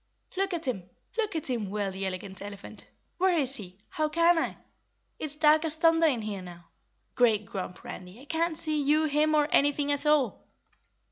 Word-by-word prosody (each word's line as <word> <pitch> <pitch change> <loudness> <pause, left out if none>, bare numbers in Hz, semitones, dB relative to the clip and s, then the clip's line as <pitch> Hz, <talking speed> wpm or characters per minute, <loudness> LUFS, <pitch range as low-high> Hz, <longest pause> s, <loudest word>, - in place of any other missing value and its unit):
"Look 390 +1 0
at 330 -1 -5
him! 190 -9 -3 0.3
Look 430 -5 -1
at 320 - -2
him!" 230 -6 -2
wailed 200 -1 -2
the 190 0 -3
Elegant 190 0 -6
Elephant. 200 0 -9 0.3
"Where 370 -1 +3
is 275 -2 0
he? 185 -4 -10
How 310 -1 -1
can 335 +2 +4
I? - - -2 0.6
It's 300 -1 -4
dark 305 +1 +5
as 320 -1 0
thunder 330 0 +4
in 245 -7 0
here 205 -3 -4
now! 175 -1 -12 0.4
Great 220 -4 +3
Grump, 185 -2 -6
Randy, 185 +4 -9
I 270 - -13
can't 325 +1 -1
see 310 -2 0
you, 300 +2 +3
him 305 +1 +2
or 295 -1 +3
anything 290 0 +3
at 285 +1 0
all." 290 -7 +2
285 Hz, 190 wpm, -28 LUFS, 200-315 Hz, 0.6 s, dark